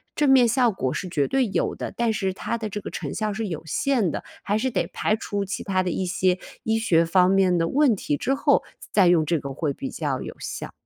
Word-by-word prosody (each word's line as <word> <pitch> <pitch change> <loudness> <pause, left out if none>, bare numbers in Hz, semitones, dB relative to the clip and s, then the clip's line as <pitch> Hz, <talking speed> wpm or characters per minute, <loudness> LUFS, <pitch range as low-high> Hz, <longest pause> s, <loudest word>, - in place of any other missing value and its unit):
正 290 -2 +3
面 255 -3 +6
效 240 0 +3
果 130 -10 -2
是 185 - -4
绝 145 -6 0
对 270 -1 +2
有 200 - -1
的， - - -6
但 235 -1 +1
是 195 -3 -1
它 235 - -3
的 220 -2 -4
这 210 +1 -5
个 - - -6
成 - - -5
效 215 0 -1
是 220 +2 -3
有 165 -5 -4
限 240 - +1
的， - - -4 0.2
还 205 +1 0
是 260 +4 -1
得 - - 0
排 215 - 0
除 205 -2 -3
其 205 +2 -4
他 185 -2 0
的 180 - -1
一 185 +2 -2
些 185 0 +1 0.2
医 225 0 +1
学 170 -7 +3
方 180 +2 +4
面 190 -2 +3
的 165 - +1
问 275 - +3
题 145 -6 -2
之 270 - 0
后， 275 - +2 0.3
再 205 - +3
再 185 - +6
用 165 -3 +3
这 165 +1 +1
个 140 0 -6
会 150 0 -2
比 135 - -5
较 140 -5 -3
有 - - -6
效。 - - -6
195 Hz, 275 characters per minute, -24 LUFS, 170-225 Hz, 0.3 s, 面